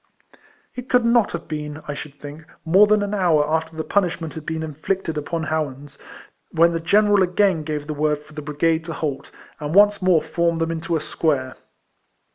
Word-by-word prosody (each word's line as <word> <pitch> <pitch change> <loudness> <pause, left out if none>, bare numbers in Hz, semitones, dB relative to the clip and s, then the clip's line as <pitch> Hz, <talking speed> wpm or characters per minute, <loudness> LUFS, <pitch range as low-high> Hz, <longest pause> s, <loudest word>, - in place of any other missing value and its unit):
It 250 +1 -8
could 250 -1 +3
not 235 -2 +3
have - - -6
been, 150 0 -6
I 145 - -3
should 145 0 -9
think, 150 +2 -10 0.2
more 190 +6 +6
than 210 0 +3
an 205 0 -3
hour 165 -7 +2
after 160 +1 -1
the 160 - -3
punishment 175 -5 -1
had 160 -1 -9
been 160 0 -3
inflicted 160 +3 -3
upon 160 +2 -3
Howans, 145 -3 -4 0.5
when 170 +1 +4
the 165 - -2
general 205 +4 +3
again 185 -1 +2
gave 150 -1 -4
the 155 - -4
word 150 0 0
for 150 - -18
the 150 - -6
brigade 160 +2 0
to 165 - -5
halt, 145 -4 -4 0.3
and 150 +2 -4
once 205 0 +5
more 180 -4 +3
formed 170 0 0
them 165 0 0
into 165 0 -2
square. 145 -4 -1
160 Hz, 190 wpm, -22 LUFS, 150-185 Hz, 0.5 s, more